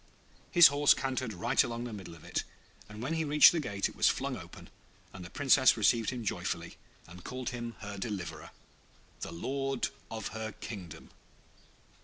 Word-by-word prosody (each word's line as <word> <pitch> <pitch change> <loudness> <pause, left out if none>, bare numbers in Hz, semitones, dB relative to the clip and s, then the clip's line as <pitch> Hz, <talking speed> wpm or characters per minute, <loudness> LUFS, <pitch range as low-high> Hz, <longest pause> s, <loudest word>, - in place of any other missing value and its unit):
His 175 -3 +8
horse 145 0 +4
cantered 130 -3 -2
right 115 +9 +2
along 120 -2 -4
the 120 -2 -6
middle 95 -5 -9
of 80 - -16
it, - - -2 0.5
and 105 +2 -8
when 145 +6 -2
he 160 0 0
reached 150 0 +7
the 170 - -1
gate 100 -9 -1
it - - -12
was - - +4
flung - - -2
open - - -11 0.4
and 95 - -9
the 85 - -9
Princess 130 -1 +4
received 115 +1 +3
him 125 -3 -5
joyfully, - - -3 0.3
and 90 +1 -12
called 130 0 -4
him 120 -1 -6
her 105 -1 -7
Deliverer, 100 -5 -5
and - - -22 0.7
the - - -5
Lord 135 +9 -2 0.2
of 110 -2 -5
her 110 -1 -5
Kingdom. 90 -8 -9
115 Hz, 180 wpm, -31 LUFS, 100-135 Hz, 0.7 s, His